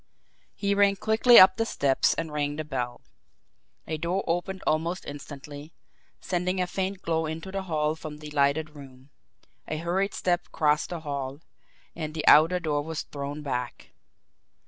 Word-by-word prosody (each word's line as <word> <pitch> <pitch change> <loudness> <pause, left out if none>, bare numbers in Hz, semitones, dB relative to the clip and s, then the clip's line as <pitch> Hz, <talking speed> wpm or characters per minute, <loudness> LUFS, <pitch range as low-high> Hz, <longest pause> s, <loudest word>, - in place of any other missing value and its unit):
He 200 -1 0
ran 200 0 +4
quickly 220 +4 +5
up 185 +1 +9
the 225 - +1
steps 135 -8 +2
and 160 - -4
rang 145 -1 -1
the 155 - -3
bell. 125 -5 -4 0.8
A 155 -1 -4
door 175 +4 -1
opened 175 +3 -2
almost 165 +4 -1
instantly, 145 +1 -9 0.5
sending 180 +1 -1
a 180 - +2
faint 190 +1 -3
glow 160 -1 0
into 160 +4 -6
the 195 0 -3
hall 155 -4 0
from 155 -2 -8
the 150 0 -10
lighted 150 +2 +1
room; 135 -2 -14 0.6
a 155 - -3
hurried 180 +5 -1
step 175 -1 0
crossed 150 -1 +1
the 175 -2 -5
hall 140 -1 -5 0.5
and 155 -1 -5
the 155 - -3
outer 165 +4 +7
door 150 -4 -1
was 160 +1 -4
thrown 145 +1 -6
back. 125 -3 -4
155 Hz, 160 wpm, -27 LUFS, 145-180 Hz, 0.8 s, up